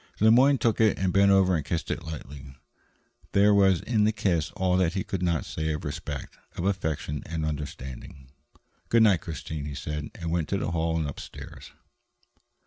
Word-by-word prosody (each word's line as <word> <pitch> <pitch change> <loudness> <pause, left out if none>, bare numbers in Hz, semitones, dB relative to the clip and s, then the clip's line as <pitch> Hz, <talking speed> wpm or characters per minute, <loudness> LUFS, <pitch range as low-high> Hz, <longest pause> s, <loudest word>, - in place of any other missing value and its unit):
Le 110 +1 +6
Moyne 135 +4 +6
took 115 -3 +1
it 110 -2 +4
and 95 -2 0
bent 100 +1 +5
over 95 -2 +4
and 75 - -1
kissed 80 +4 -3
it - - -3
lightly. 70 -3 -9 0.8
There 100 +1 +5
was 95 -3 +4
in 110 -3 +1
the 110 - +4
kiss 90 -7 0
all 95 -3 +1
that 90 -3 +2
he 95 - -1
could 95 -4 -4
not 85 -4 0
say 80 0 -3
of 75 - -5
respect, 75 -2 -6 0.2
of 85 - -2
affection 80 -6 -2
and 80 -1 -3
understanding. 70 -3 -7 0.6
"Good 115 -1 +5
night, 100 -6 +4
Christine," 80 -3 -6
he 75 -1 -6
said, 75 +1 -4
and 85 -2 -4
went 85 -2 -1
into 100 - 0
the - - -2
hall 80 0 0
and 80 -2 -1
upstairs. 70 - -9
85 Hz, 190 wpm, -27 LUFS, 75-100 Hz, 0.8 s, Le